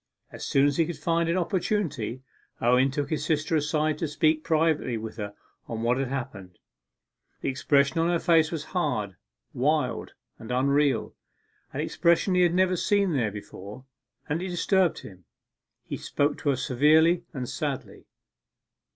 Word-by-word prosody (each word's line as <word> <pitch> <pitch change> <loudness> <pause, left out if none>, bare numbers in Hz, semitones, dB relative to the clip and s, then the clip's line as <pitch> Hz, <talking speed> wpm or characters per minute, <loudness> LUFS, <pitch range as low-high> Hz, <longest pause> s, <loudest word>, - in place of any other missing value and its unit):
As - - -9
soon 135 0 +3
as 145 -1 +1
he 165 - +2
could 175 - -5
find 165 0 0
an 170 - +1
opportunity, 170 - -1 0.4
Owen 125 +3 +3
took 145 +3 -3
his 155 -2 -1
sister 155 +1 0
aside 150 0 0
to 165 - -1
speak 155 +1 +1
privately 155 -6 +1
with 110 0 -7
her 105 -2 -5 0.3
on 115 -1 -4
what 120 +2 +2
had 135 - -1
happened. 105 -9 -6 0.8
The - - -1
expression 140 +2 +2
of 165 - +2
her 175 0 +2
face 165 -2 +3
was 160 -3 -3
hard, 105 - -1 0.4
wild, 130 -2 0 0.3
and 115 - -8
unreal 140 0 +1 0.6
an - - -3
expression 170 +3 +2
he 180 - +3
had 175 -1 +3
never 185 0 +3
seen 200 0 +1
there 120 -7 +1
before, 105 +3 -10 0.4
and 155 +3 -1
it 190 - -3
disturbed 180 0 +1
him. 90 -3 -13 0.6
He - - -5
spoke 145 +1 0
to 145 - -1
her 140 - +3
severely 155 +7 +3
and 130 -5 -5
sadly. - - -5
150 Hz, 160 wpm, -26 LUFS, 125-165 Hz, 0.8 s, soon